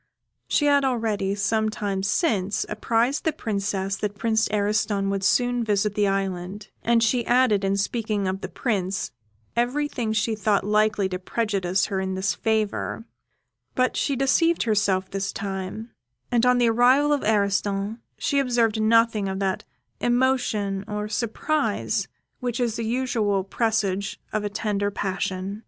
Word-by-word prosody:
She 295 - +2
had 285 -1 +4
already, 220 -6 0
some 215 +2 +1
time 205 -4 -2
since, 200 - 0
apprised 230 +5 0
the 320 - +2
Princess 200 -5 -2
that 205 0 -3
Prince 220 -1 +1
Ariston 205 -1 0
would 195 -1 -2
soon 245 +4 +2
visit 210 -1 +1
the 205 -1 +2
island, 195 +1 -3
and 230 0 +3
she 245 +3 +2
had 235 - -4 0.3
added, 200 -1 +1
in 195 0 +1
speaking 210 -1 -1
of 190 +1 -2
the - - -5
Prince, 195 -5 -2 0.4
everything 245 0 -1
that 220 - -1
she 220 +2 +1
thought 210 -1 +1
likely 210 -1 +2
to 185 -1 -3
prejudice 195 -2 0
her 195 -3 -2
in 190 0 -2
his 190 -1 0
favour; 220 +2 -1 0.7
but 255 0 +1
she 280 - 0
deceived 305 +6 +2
herself 200 -4 +1
this 195 0 -2
time; 200 +3 -5 0.4
and 240 0 +3
on 250 0 +5
the 240 -1 +4
arrival 255 +6 +4
of 290 - 0
Ariston, 200 0 0 0.2
she 280 - +1
observed 235 -4 +1
nothing 225 -2 +3
of 190 - -3
that 190 -1 -1 0.3
emotion 240 -6 +1
or 210 0 -3
surprise 240 +8 -1 0.3
which 245 -2 -3
is 235 -3 0
the 230 - -3
usual 225 -5 0
presage 200 -1 -1
of 215 - 0
a 205 - -1
tender 205 -1 -1
passion. 190 0 -3
210 Hz, 155 wpm, -24 LUFS, 195-235 Hz, 0.7 s, on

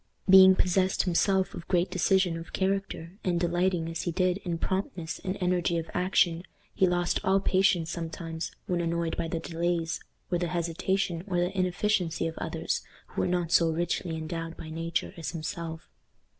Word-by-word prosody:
Being 190 0 +9
possessed 185 +1 +2
himself 190 +1 +2
of 170 - -8
great 180 0 +1
decision 185 0 +2
of 165 0 -8
character, 195 -1 -2
and 175 -2 +1
delighting, 175 0 +1
as 165 0 -3
he 175 - -2
did, 180 +2 +1
in 175 -4 -3
promptness 185 -2 -3
and 185 +1 -2
energy 180 -2 +1
of 165 0 -4
action, 180 -2 +2 0.3
he 190 - +3
lost 175 0 +1
all 190 +1 +3
patience 185 -4 +2
sometimes, 165 -1 -5
when 175 -1 0
annoyed 170 -1 -1
by 165 - -2
the 165 0 -2
delays, 165 0 -1 0.3
or 175 - +2
the 175 - 0
hesitation, 175 +1 -1
or 180 -3 -1
the 175 +3 0
inefficiency 185 -2 0
of 165 0 -3
others, - - -2 0.3
who - - -2
were - - +1
not 175 -2 0
so 165 -1 +5
richly 170 0 -1
endowed 165 +1 -5
by 160 - -8
nature 165 +1 -2
as 165 - -4
himself. 165 0 -5
175 Hz, 170 wpm, -28 LUFS, 165-185 Hz, 0.3 s, Being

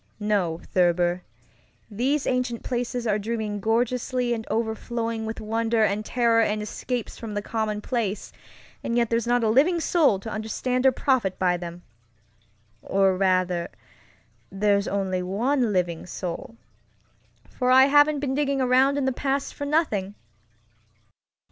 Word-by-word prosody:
No, 200 -6 0
Thurber, 175 0 +2 0.7
these 265 +7 0
ancient 250 -2 -1
places 245 0 -3
are 210 -2 +1
dreaming 215 -1 -3
gorgeously 245 +3 0
and 220 -1 -5
overflowing 225 0 -2
with 220 - -5
wonder 225 +1 0
and 210 0 0
terror 230 0 +2
and 215 -1 0
escapes 230 +3 -4
from 220 -3 -6
the 205 - -1
commonplace, 215 -1 -2 0.5
and 235 - -1
yet 235 -1 +1
there's 230 0 0
not 245 0 +2
a - - +2
living 295 +10 +3
soul 315 - +3
to 220 - -6
understand 250 +4 -1
or - - +6
profit 250 -7 0
by 180 -1 +2
them. 175 0 -7 1.0
Or, 195 -1 +2
rather, 185 -2 +1 0.8
there's 200 0 +1
only 190 -2 -1
one 230 +6 0
living 175 -3 -1
soulŌĆöfor 180 +6 -6 1.2
I 260 +1 +8
haven't 290 +1 +4
been 270 -2 -1
digging 280 -1 0
around 260 +2 +3
in 280 - 0
the 265 - +2
past 275 +2 -2
for 285 - -5
nothing! 220 - 0
225 Hz, 135 wpm, -25 LUFS, 200-255 Hz, 1.2 s, I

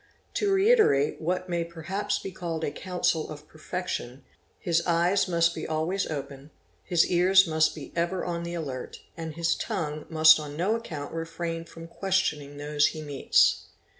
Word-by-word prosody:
To 410 -1 +1
reiterate 390 - +4
what 180 +3 -1
may 170 -1 -1
perhaps 190 +5 -3
be 195 - -6
called 170 -3 -4
a 145 - -1
counsel 175 -1 -1
of 150 0 -10
perfection, 155 -6 -5 0.3
his 170 -1 +1
eyes 175 +4 +2
must 170 -1 +2
be - - -6
j - - -5
always 160 +5 -1
open, 140 -1 -6 0.3
his 170 -2 +3
ears 185 +2 +5
must 155 -1 +2
be 150 - -9
ever 175 +2 -1
on 170 -1 -3
the 170 0 -5
alert, 135 -6 -6
and 160 -2 -6
his 170 0 +1
tongue 150 -3 -4
must 155 0 +7
on 150 -1 -7
no 190 +6 +1
account 160 -12 -6
refrain 165 0 -4
from 165 0 -11
questioning 165 -6 -1
those 145 0 +2
he 155 - -5
meets. 145 -2 +2
165 Hz, 165 wpm, -27 LUFS, 155-180 Hz, 0.3 s, must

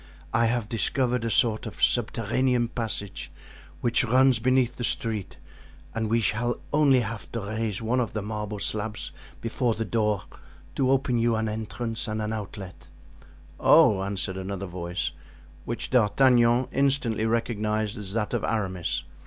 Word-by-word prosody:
I 115 0 +4
have 120 -2 0
discovered 125 +2 0
a 115 - 0
sort 110 -2 +2
of - - -6
subterranean 120 +1 +1
passage 110 -5 -4 0.5
which 120 +2 +2
runs 130 0 +4
beneath 130 +1 +2
the 120 - -4
street 110 -4 -2 0.6
and 110 -1 -1
we 115 +1 +2
shall 120 +4 0
only 140 -4 +5
have 110 -1 -6
to 115 - -2
raise 110 0 -3
one 120 +3 +1
of 120 - -1
the 105 - -2
marble 105 0 -4
slabs 105 +1 -3 0.3
before 115 0 0
the 115 +1 -2
door 105 -3 0 0.5
to 130 -2 +1
open 130 -2 +2
you 115 0 +2
an 110 0 0
entrance 110 +2 -3
and 110 0 -2
an 105 0 -2
outlet." 100 -3 -7 0.7
"Oh!" 100 -3 +6
answered 95 -1 -3
another 95 0 -4
voice, 90 -1 -3 0.5
which 115 0 -4
D'Artagnan 120 +1 +4
instantly 130 -5 +1
recognized 110 -2 0
as 100 -1 -6
that 105 -2 -1
of - - 0
Aramis. 95 -6 -1
115 Hz, 150 wpm, -26 LUFS, 105-120 Hz, 0.7 s, Oh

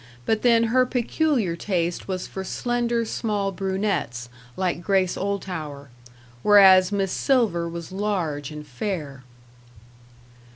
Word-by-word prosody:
But 220 -1 +1
then 230 -2 +4
her 255 0 +5
peculiar 250 - 0
taste 175 -2 -2
was 185 -1 -3
for 190 - -6
slender, 240 +2 -1
small 205 -3 -2
brunettes, 190 - -2 0.3
like 180 -2 -1
Grace 185 0 +1
Oldtower; 165 -8 -4 0.5
whereas 190 -1 +7
Miss 195 -2 0
Silver 205 -12 +1
was 170 +1 -7
large 180 -8 -2
and 150 -1 -8
fair. 145 - -5
190 Hz, 115 wpm, -24 LUFS, 170-210 Hz, 0.5 s, whereas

